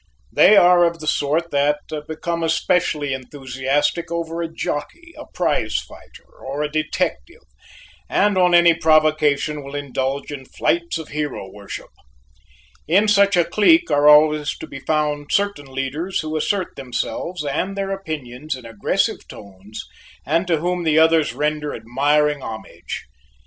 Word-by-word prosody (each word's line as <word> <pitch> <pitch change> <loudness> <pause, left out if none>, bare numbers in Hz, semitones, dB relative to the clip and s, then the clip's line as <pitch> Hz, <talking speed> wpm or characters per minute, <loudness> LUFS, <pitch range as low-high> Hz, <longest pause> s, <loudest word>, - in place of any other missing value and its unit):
They 210 - +6
are 175 -1 +6
of 170 0 +1
the 155 - -9
sort 155 +3 0
that 145 +1 +2 0.3
become 170 +2 -3
especially 165 -3 0
enthusiastic 135 +4 -2
over 170 0 -3
a 165 -1 -4
jockey, 330 - -5
a - - -10
prize - - -1
fighter, 470 0 -7
or 145 +2 -4
a 150 - -3
detective, 175 - -3 0.7
and 205 -1 +2
on 180 -1 +4
any 170 -1 +6
provocation 155 -2 +2
will 140 +1 -8
indulge 140 0 -3
in 135 -2 -7
flights 170 +5 -1
of 160 - -8
hero 145 -10 -4
worship. 100 -1 -9 1.0
In 195 +7 +3
such 200 -2 +4
a 175 - +4
clique 215 - +3
are 145 0 +5
always 150 0 +4
to - - -8
be 140 - -9
found 150 0 -1
certain 200 -8 0
leaders 135 +7 -3
who 155 0 -5
assert 185 +4 -1
themselves 145 +5 -4
and 185 +8 -2
their 195 0 -2
opinions 155 -7 -5
in 125 -2 -12
aggressive 115 -3 -1
tones 100 +1 -11 0.4
and 165 +5 0
to 165 -2 +2
whom 175 +3 -1
the 155 -1 +2
others 160 -1 +4
render 150 0 -2
admiring 145 +4 +1
homage. 110 -3 -7
155 Hz, 145 wpm, -20 LUFS, 145-170 Hz, 1.0 s, They